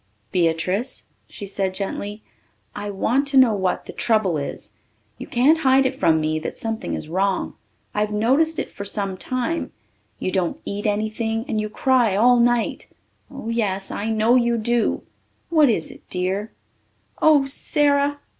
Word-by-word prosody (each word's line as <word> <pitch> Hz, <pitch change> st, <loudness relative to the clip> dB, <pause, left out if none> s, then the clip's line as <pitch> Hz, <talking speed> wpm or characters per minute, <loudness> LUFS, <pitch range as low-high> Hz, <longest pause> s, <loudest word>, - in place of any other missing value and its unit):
"Beatrice," 180 Hz, +7 st, 0 dB, 0.3 s
she 205 Hz, -, -7 dB
said 195 Hz, -1 st, -2 dB
gently, 205 Hz, +2 st, -5 dB, 0.5 s
"I 205 Hz, 0 st, -4 dB
want 245 Hz, +8 st, 0 dB
to 275 Hz, -1 st, +2 dB
know 255 Hz, -4 st, +6 dB
what 190 Hz, -3 st, -1 dB
the -, -, -9 dB
trouble 215 Hz, -7 st, +1 dB
is. 140 Hz, -, -7 dB, 0.5 s
You -, -, -7 dB
can't 280 Hz, +7 st, +3 dB
hide 265 Hz, -2 st, +4 dB
it 260 Hz, -, +1 dB
from 160 Hz, -10 st, +3 dB
me 155 Hz, 0 st, 0 dB
that 155 Hz, -, -6 dB
something 225 Hz, 0 st, -3 dB
is -, -, -6 dB
wrong. 190 Hz, +3 st, 0 dB, 0.4 s
I've 210 Hz, 0 st, 0 dB
noticed 265 Hz, +10 st, +2 dB
it -, -, -3 dB
for 200 Hz, -, -7 dB
some 200 Hz, -1 st, -3 dB
time. 255 Hz, -, -3 dB, 0.5 s
You 185 Hz, -, -3 dB
don't 185 Hz, -3 st, -1 dB
eat 205 Hz, +1 st, -3 dB
anything 220 Hz, +2 st, -1 dB
and 220 Hz, -6 st, -1 dB
you 215 Hz, -, -3 dB
cry 240 Hz, -3 st, +2 dB
all 245 Hz, +4 st, +5 dB
night 240 Hz, -1 st, +1 dB, 0.4 s
oh, 275 Hz, -4 st, -7 dB
yes, 200 Hz, -4 st, -1 dB
I 210 Hz, +2 st, -3 dB
know 220 Hz, +2 st, +3 dB
you 235 Hz, -2 st, +3 dB
do. 235 Hz, +1 st, 0 dB, 0.5 s
What 310 Hz, -5 st, +5 dB
is 270 Hz, +5 st, 0 dB
it, 280 Hz, -, -14 dB
dear?" 190 Hz, +4 st, -2 dB, 0.7 s
"Oh, 300 Hz, -3 st, +5 dB
Sara!" 285 Hz, +1 st, +1 dB
220 Hz, 160 wpm, -22 LUFS, 195-260 Hz, 0.7 s, know